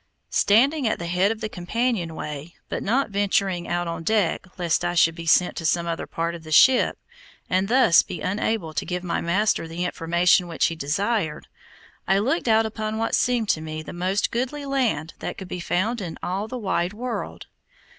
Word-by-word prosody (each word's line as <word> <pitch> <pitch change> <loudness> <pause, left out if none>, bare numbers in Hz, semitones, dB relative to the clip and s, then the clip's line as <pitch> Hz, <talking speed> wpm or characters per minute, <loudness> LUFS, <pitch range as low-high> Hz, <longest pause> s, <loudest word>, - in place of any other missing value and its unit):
Standing 265 +6 +3
at 220 - 0
the 170 - -6
head 180 +4 +2
of 225 0 -5
the 215 - -1
companionway, 175 - -3
but - - -3
not 245 +3 0
venturing 195 -3 0
out 175 0 -1
on 165 -1 -4
deck 195 0 0
lest 175 -2 0
I 175 0 -1
should 165 -1 +4
be 165 0 -8
sent 180 +2 +4
to - - -4
some 170 +1 +1
other 165 -1 -3
part 165 +1 -2
of 170 -1 -9
the 155 - -10
ship, 255 - +5 0.5
and 185 +1 +2
thus 240 -7 +6
be 180 - -7
unable 190 -2 -2
to - - -1
give 180 -1 -4
my 175 - -1
master 185 0 +1
the 170 +2 -3
information 175 +1 +2
which 165 - 0
he 165 - -1
desired, 165 +3 -1 0.6
I 195 - +4
looked 255 - 0
out 225 0 +4
upon 220 0 -3
what 225 0 -1
seemed 240 -4 +1
to 155 - +2
me 155 0 -6
the - - -8
most 185 +3 0
goodly 260 +5 -2
land 240 - -1
that - - -5
could 190 - -8
be 180 - -5
found 210 +7 -1
in 170 -4 -6
all 195 +4 -2
the 250 +3 -5
wide 190 -4 -1
world. 240 +2 -5
185 Hz, 195 wpm, -24 LUFS, 170-220 Hz, 0.6 s, thus